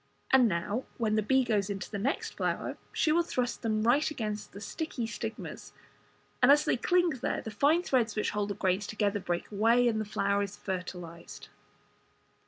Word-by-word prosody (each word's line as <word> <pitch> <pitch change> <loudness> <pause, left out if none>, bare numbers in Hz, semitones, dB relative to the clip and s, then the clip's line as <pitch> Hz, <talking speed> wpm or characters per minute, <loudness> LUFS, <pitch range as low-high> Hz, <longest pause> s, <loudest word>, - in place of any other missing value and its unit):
And 260 -2 +6
now, 205 +6 -2
when 225 -4 0
the 215 - +3
bee 265 +5 +3
goes 210 -4 0
into 195 -2 -5
the 205 - -3
next 270 - -1
flower, - - -2 0.2
she 310 - +2
will 335 +2 +4
thrust 250 -7 -2
them 215 -2 0
right 275 +8 +3
against 215 -7 -4
the 200 - -9
sticky 250 +2 -4
stigmas, 225 0 -6 0.7
and - - +7
as 295 +1 +5
they - - +2
cling 350 +7 +2
there 265 -4 -2
the 220 - -5
fine 295 +10 +3
threads 240 - +1
which 210 - 0
hold 210 -1 -1
the 200 - -2
grains 190 +2 0
together 205 -1 0
break 175 0 -3
away, 230 +4 +4
and 220 -2 +1
the - - -3
flower 200 -1 0
is 200 0 -4
fertilized. 180 -3 -6
220 Hz, 190 wpm, -30 LUFS, 200-255 Hz, 0.7 s, and